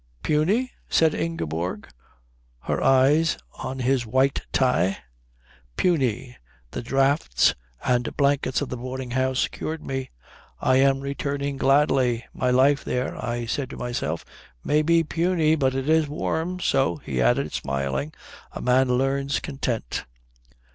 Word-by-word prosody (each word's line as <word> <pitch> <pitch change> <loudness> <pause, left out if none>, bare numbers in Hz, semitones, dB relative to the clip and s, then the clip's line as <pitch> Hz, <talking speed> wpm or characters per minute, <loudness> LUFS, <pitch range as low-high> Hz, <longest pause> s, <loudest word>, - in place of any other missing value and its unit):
"Puny?" 195 +12 +1 0.2
said 160 -2 +3
Ingeborg, 90 - -3 0.7
her - - -2
eyes 145 +5 +4 0.2
on 130 - -4
his 130 0 +1
white 130 +4 +1
tie. 110 -7 +2 0.8
"Puny. 130 - 0 0.3
The - - -4
draughts 135 - +2 0.3
and 125 -1 0
blankets 140 -2 +1
of 145 - -3
the 125 - -4
boarding 130 +1 -6
house 130 0 +1
cured 155 0 -6
me. 135 -1 -3 0.5
I 130 - +3
am 135 0 +3
returning 140 0 -3
gladly. 135 -3 +2
My 125 - 0
life 135 +3 +4
there, 125 0 -2
I 120 -1 -2
say 135 +3 -2
to - - -9
myself, 120 -10 -3 0.4
may 150 +1 +2
be 165 +2 +3
puny 165 0 +1
but 135 -4 +1
it 135 +1 -2
is 160 -1 +3
warm. 165 +4 -2
So," 135 - +1
he 65 -3 -3
added, - - +2
smiling, 70 +2 -2 0.4
"a - - -6
man 130 +1 +3
learns 135 +2 0
content." 125 - -3
135 Hz, 135 wpm, -24 LUFS, 125-145 Hz, 0.8 s, eyes